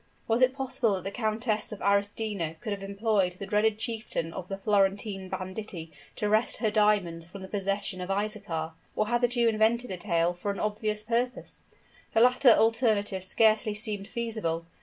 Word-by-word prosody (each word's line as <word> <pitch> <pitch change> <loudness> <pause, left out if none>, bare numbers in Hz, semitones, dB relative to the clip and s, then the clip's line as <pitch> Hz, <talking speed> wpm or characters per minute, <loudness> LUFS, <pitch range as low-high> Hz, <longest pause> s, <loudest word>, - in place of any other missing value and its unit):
Was 230 +2 +2
it 255 +1 +4
possible 260 -5 0
that 185 - -5
the 195 - -4
Countess 220 -1 -1
of 210 - -7
Arestino 200 -4 0
could 220 - -5
have 200 - -6
employed 200 -1 0
the 190 +2 -7
dreaded 210 +1 +2
chieftain 220 -8 -3
of 185 -1 -6
the 195 - -4
Florentine 195 -1 0
banditti 185 -4 -5 0.2
to 210 - -1
wrest 215 +3 +2
her 220 -3 0
diamonds 200 -6 +2
from 190 +2 -10
the - - -7
possession 195 -1 -2
of 180 - -5
Isaachar? 195 -5 -2 0.2
or 215 - +1
had 240 0 +1
the 245 - +4
Jew 240 -1 +1
invented 225 +2 +2
the 185 - -2
tale 170 0 +1
for 175 +3 -5
an 200 - -2
obvious 210 0 -1
purpose? 240 +3 -2 0.5
The 225 - +4
latter 250 +2 +6
alternative 220 -4 +3
scarcely 215 +2 +3
seemed 210 -2 -1
feasible. 220 -9 -2
210 Hz, 180 wpm, -28 LUFS, 195-225 Hz, 0.5 s, latter